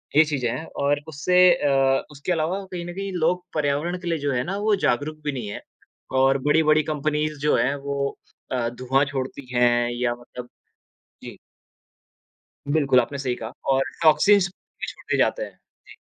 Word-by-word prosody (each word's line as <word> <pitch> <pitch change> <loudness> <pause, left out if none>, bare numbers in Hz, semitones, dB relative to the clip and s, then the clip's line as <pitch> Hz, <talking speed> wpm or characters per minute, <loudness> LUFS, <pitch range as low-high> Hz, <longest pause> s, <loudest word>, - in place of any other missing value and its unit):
ये 155 - +8
चीज़ें 135 -6 -1
है 135 +7 -5
और 145 +1 -1
उससे 160 +4 -1 0.2
अ, 135 -3 +2
उसके 150 +5 -4
अलावा 175 +4 -1
कहीं 175 -1 -5
न 175 - -6
कहीं 195 +1 -4
लोग 175 +1 0
पर्यावरण 150 +4 0
के 175 - -8
लिए 165 -1 0
जो - - +2
है 125 0 0
ना 195 +4 -3
वो 210 0 +2
जागरूक 145 +5 0
भी 150 - 0
नहीं 125 -6 -5
हैं - - -6 0.6
और 135 +1 +4
बड़ी-बड़ी 155 0 +4
कंपनीज़ 150 0 -1
जो 150 +1 +2
है 135 +3 +1
वो 140 0 -3 0.3
अ, 120 -2 0
धुआँ 130 +3 +1
छोड़ती 135 -1 -5
हैं 120 0 +3
या 120 0 0
मतलब 120 0 -10 0.8
जी। - - -9 1.3
बिल्कुल, 140 -4 +4
आपने 140 +4 -4
सही 130 -2 -1
कहा 110 -1 -7 0.2
और 135 0 +3 0.2
टॉक्सिन्स 195 +5 +5
भी 190 - -10
छोड़ते - - -3
जाते - - +2
हैं। - - -12 0.3
जी। - - -14
145 Hz, 175 wpm, -24 LUFS, 130-160 Hz, 1.3 s, ये